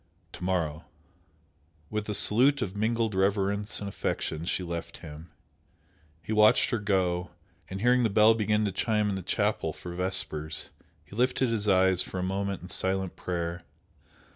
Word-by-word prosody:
"To -, -, -9 dB
morrow!" 85 Hz, -4 st, -1 dB, 1.1 s
With 105 Hz, 0 st, -3 dB
a 105 Hz, -, +2 dB
salute 130 Hz, +7 st, +4 dB
of 95 Hz, -2 st, -5 dB
mingled 110 Hz, +1 st, 0 dB
reverence 100 Hz, +1 st, 0 dB
and 100 Hz, -, -5 dB
affection 80 Hz, -4 st, -3 dB
she 90 Hz, -, -1 dB
left 85 Hz, -1 st, -5 dB
him. 80 Hz, +2 st, -10 dB, 0.9 s
He 110 Hz, -, -3 dB
watched 105 Hz, 0 st, +5 dB
her 120 Hz, -, 0 dB
go, 90 Hz, -4 st, 0 dB, 0.4 s
and 95 Hz, +1 st, -5 dB
hearing 125 Hz, +2 st, +4 dB
the 115 Hz, -, +2 dB
bell 105 Hz, +2 st, +6 dB
begin 110 Hz, -1 st, +1 dB
to 100 Hz, -, -1 dB
chime 105 Hz, +2 st, 0 dB
in 100 Hz, -, -1 dB
the 95 Hz, -, -4 dB
chapel -, -, -1 dB
for 90 Hz, -, -8 dB
vespers, 90 Hz, -4 st, -2 dB, 0.4 s
he 90 Hz, -, -13 dB
lifted 125 Hz, +1 st, +1 dB
his 105 Hz, -2 st, 0 dB
eyes 95 Hz, -1 st, +4 dB
for -, -, -5 dB
a 90 Hz, -, -1 dB
moment 95 Hz, 0 st, -2 dB
in 90 Hz, -, -9 dB
silent 95 Hz, -1 st, -1 dB
prayer. 85 Hz, -1 st, -3 dB
95 Hz, 165 wpm, -28 LUFS, 90-105 Hz, 1.1 s, bell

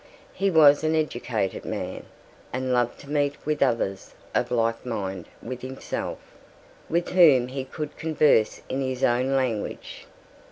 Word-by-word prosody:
He 195 Hz, +1 st, +1 dB
was 150 Hz, -4 st, +6 dB
an 155 Hz, 0 st, +2 dB
educated 120 Hz, -10 st, -1 dB
man, -, -, -5 dB, 0.4 s
and 130 Hz, 0 st, -1 dB
loved 120 Hz, -1 st, +1 dB
to 140 Hz, -, -13 dB
meet 145 Hz, -1 st, +1 dB
with 150 Hz, 0 st, -1 dB
others 115 Hz, -7 st, 0 dB, 0.2 s
of -, -, +1 dB
like 115 Hz, -1 st, 0 dB
mind 95 Hz, -7 st, -4 dB, 0.2 s
with 125 Hz, +1 st, -6 dB
himself, 130 Hz, +1 st, -5 dB, 0.7 s
with 170 Hz, +2 st, 0 dB
whom 150 Hz, -9 st, +6 dB
he 135 Hz, 0 st, -4 dB
could 150 Hz, +2 st, -6 dB
converse 155 Hz, -8 st, +2 dB
in 135 Hz, +1 st, -2 dB
his 130 Hz, -1 st, -3 dB
own 125 Hz, +3 st, +2 dB
language. 125 Hz, -6 st, -3 dB
130 Hz, 145 wpm, -25 LUFS, 120-150 Hz, 0.7 s, was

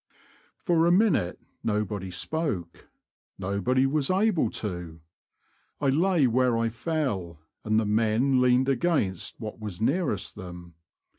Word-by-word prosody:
For 170 Hz, -2 st, +2 dB
a -, -, +4 dB
minute 180 Hz, -, +2 dB, 0.2 s
nobody 105 Hz, -3 st, -2 dB
spoke 95 Hz, -, -3 dB, 0.2 s
— -, -, -62 dB
nobody 125 Hz, +7 st, +1 dB
was 140 Hz, 0 st, 0 dB
able 185 Hz, -, +2 dB, 0.2 s
to. 90 Hz, -4 st, -5 dB, 0.8 s
I 140 Hz, -, +1 dB
lay 165 Hz, +2 st, +3 dB
where 125 Hz, 0 st, +2 dB
I 115 Hz, 0 st, +1 dB
fell, 115 Hz, -, -3 dB, 0.3 s
and 110 Hz, 0 st, +2 dB
the 110 Hz, -, 0 dB
men 115 Hz, +5 st, +2 dB
leaned 125 Hz, +1 st, +3 dB
against 135 Hz, -, 0 dB
what 110 Hz, -2 st, -7 dB
was 105 Hz, -4 st, -6 dB
nearest 135 Hz, -, 0 dB
them. 90 Hz, -3 st, -10 dB
115 Hz, 130 wpm, -27 LUFS, 100-150 Hz, 0.8 s, a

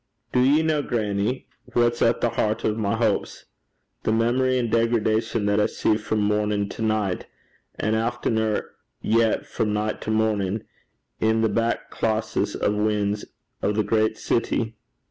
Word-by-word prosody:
'Do 125 Hz, -, +3 dB
ye 145 Hz, +5 st, +4 dB
ken, 150 Hz, -2 st, 0 dB
grannie, 105 Hz, +1 st, -1 dB, 0.3 s
what's 120 Hz, 0 st, +2 dB
at 115 Hz, 0 st, +3 dB
the 120 Hz, -, +2 dB
hert 110 Hz, -1 st, 0 dB
o' 110 Hz, -, +2 dB
my 105 Hz, -1 st, -1 dB
houps 110 Hz, -3 st, -1 dB
i' -, -, -35 dB, 0.6 s
the -, -, 0 dB
meesery 125 Hz, +3 st, +2 dB
an' 120 Hz, -2 st, 0 dB
degradation 115 Hz, -1 st, +1 dB
that 105 Hz, 0 st, +2 dB
I 105 Hz, -, +3 dB
see 110 Hz, -, +1 dB
frae 110 Hz, 0 st, -2 dB
mornin' 105 Hz, -1 st, +1 dB
to -, -, -7 dB
nicht, 110 Hz, -4 st, 0 dB, 0.5 s
and 110 Hz, +1 st, 0 dB
aftener 110 Hz, -1 st, 0 dB, 0.4 s
yet 115 Hz, 0 st, +2 dB
frae 110 Hz, -, -2 dB
nicht 105 Hz, +1 st, -1 dB
to -, -, -5 dB
mornin' 110 Hz, -2 st, 0 dB, 0.6 s
i' 110 Hz, -, +4 dB
the 110 Hz, 0 st, +2 dB
back 115 Hz, +1 st, -1 dB
closes 110 Hz, 0 st, -1 dB
and 105 Hz, 0 st, 0 dB
wynds 105 Hz, -1 st, 0 dB, 0.4 s
o' -, -, +1 dB
the 105 Hz, +1 st, +1 dB
great 110 Hz, +1 st, +1 dB
city?' 115 Hz, -1 st, -1 dB
110 Hz, 160 wpm, -24 LUFS, 105-115 Hz, 0.6 s, ye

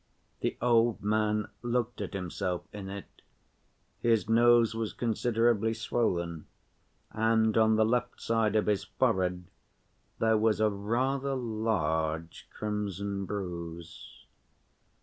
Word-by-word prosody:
The -, -, -2 dB
old 120 Hz, -2 st, +3 dB
man 105 Hz, 0 st, +1 dB
looked 120 Hz, 0 st, -1 dB
at -, -, -5 dB
himself 90 Hz, -1 st, -3 dB
in 100 Hz, -2 st, -7 dB
it; 100 Hz, 0 st, -6 dB, 0.9 s
his 115 Hz, -3 st, +2 dB
nose 115 Hz, 0 st, +5 dB
was 115 Hz, -1 st, -3 dB
considerably 115 Hz, -1 st, +1 dB
swollen, 85 Hz, -8 st, -1 dB, 0.6 s
and 110 Hz, 0 st, +2 dB
on 110 Hz, -1 st, +4 dB
the 110 Hz, 0 st, +4 dB
left 125 Hz, +2 st, -1 dB
side 115 Hz, -2 st, +1 dB
of 105 Hz, -, +3 dB
his 105 Hz, -2 st, +1 dB
forehead 90 Hz, -1 st, 0 dB, 0.7 s
there 110 Hz, -1 st, +3 dB
was 110 Hz, -1 st, +2 dB
a 110 Hz, -1 st, +3 dB
rather 130 Hz, +7 st, -1 dB
large 85 Hz, -9 st, -2 dB
crimson 100 Hz, -2 st, -3 dB
bruise. 85 Hz, -4 st, -7 dB
110 Hz, 110 wpm, -30 LUFS, 100-115 Hz, 0.9 s, nose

